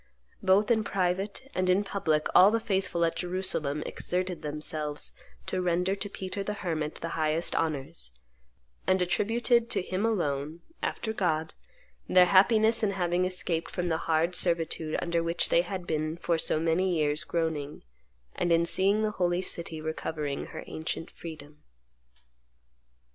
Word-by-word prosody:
Both 195 Hz, +4 st, +4 dB
in 220 Hz, -2 st, +3 dB
private 195 Hz, +3 st, -1 dB
and 185 Hz, 0 st, 0 dB
in 190 Hz, +3 st, +4 dB
public 160 Hz, -7 st, 0 dB
all 190 Hz, -, +8 dB
the 230 Hz, +2 st, +1 dB
faithful 190 Hz, -5 st, 0 dB
at 165 Hz, -, -1 dB
Jerusalem 175 Hz, -5 st, -1 dB
exerted 180 Hz, 0 st, -2 dB
themselves 150 Hz, 0 st, -3 dB, 0.3 s
to 185 Hz, -, -1 dB
render 180 Hz, +1 st, +1 dB
to 200 Hz, +1 st, -4 dB
Peter 195 Hz, +1 st, -5 dB
the 210 Hz, +1 st, -3 dB
Hermit 160 Hz, -6 st, -3 dB
the 165 Hz, -, -5 dB
highest 160 Hz, +1 st, 0 dB
honors, 135 Hz, -, -1 dB, 0.7 s
and 185 Hz, -, +3 dB
attributed 230 Hz, +6 st, +2 dB
to 215 Hz, -, 0 dB
him 185 Hz, +2 st, -2 dB
alone, 160 Hz, -7 st, -1 dB, 0.2 s
after 220 Hz, -, -2 dB
God, 160 Hz, -6 st, 0 dB, 0.6 s
their 180 Hz, -1 st, +7 dB
happiness 220 Hz, +5 st, +5 dB
in 215 Hz, -, +2 dB
having 180 Hz, -1 st, +1 dB
escaped 180 Hz, -2 st, -1 dB
from 180 Hz, -1 st, -2 dB
the 160 Hz, -, +1 dB
hard 165 Hz, +3 st, +2 dB
servitude 165 Hz, -3 st, 0 dB
under 170 Hz, -1 st, 0 dB
which 165 Hz, +1 st, +1 dB
they 170 Hz, -, +5 dB
had 180 Hz, 0 st, -5 dB
been 155 Hz, 0 st, -2 dB
for 170 Hz, -1 st, 0 dB
so 155 Hz, -, +2 dB
many 170 Hz, +3 st, +1 dB
years 150 Hz, 0 st, +1 dB
groaning, 160 Hz, -4 st, -2 dB, 0.5 s
and 175 Hz, -, 0 dB
in 165 Hz, 0 st, +4 dB
seeing 195 Hz, +5 st, +2 dB
the 215 Hz, -, +1 dB
holy 180 Hz, -2 st, 0 dB
city 170 Hz, -3 st, -3 dB
recovering 155 Hz, -2 st, -3 dB
her -, -, -8 dB
ancient 160 Hz, +1 st, -5 dB
freedom." 150 Hz, -3 st, -10 dB
175 Hz, 150 wpm, -29 LUFS, 160-190 Hz, 0.7 s, all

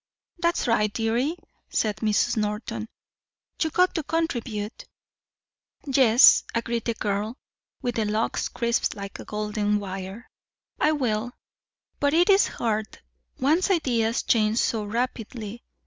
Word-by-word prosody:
"That's 340 Hz, 0 st, +1 dB
right, 215 Hz, -3 st, +2 dB
dearie," 235 Hz, +9 st, 0 dB, 0.3 s
said 215 Hz, -2 st, 0 dB
Mrs. 215 Hz, -2 st, +1 dB
Norton. 215 Hz, +1 st, -3 dB, 0.7 s
"You 320 Hz, -, +2 dB
got 365 Hz, +3 st, +3 dB
to 325 Hz, -, -1 dB
contribute." 245 Hz, -9 st, -3 dB, 1.0 s
"Yes," 260 Hz, -3 st, +6 dB
agreed 230 Hz, 0 st, -1 dB
the 230 Hz, -, -1 dB
girl 210 Hz, +4 st, -2 dB, 0.5 s
with 245 Hz, -1 st, -2 dB
the 220 Hz, -, +1 dB
"locks 215 Hz, +2 st, -1 dB
crisped 235 Hz, -1 st, 0 dB
like 200 Hz, -1 st, -7 dB
golden 210 Hz, 0 st, -1 dB
wire," 195 Hz, +3 st, -7 dB, 0.5 s
"I 305 Hz, -, +3 dB
will. 245 Hz, -4 st, -1 dB, 0.7 s
But 285 Hz, +1 st, +2 dB
it's 390 Hz, +4 st, +5 dB
hard. 220 Hz, -2 st, -2 dB, 0.4 s
One's 315 Hz, +9 st, +2 dB
ideas 240 Hz, -, +1 dB
change 215 Hz, -1 st, +2 dB
so 220 Hz, -3 st, +1 dB
rapidly. 230 Hz, 0 st, -4 dB
230 Hz, 115 wpm, -25 LUFS, 210-260 Hz, 1.0 s, Yes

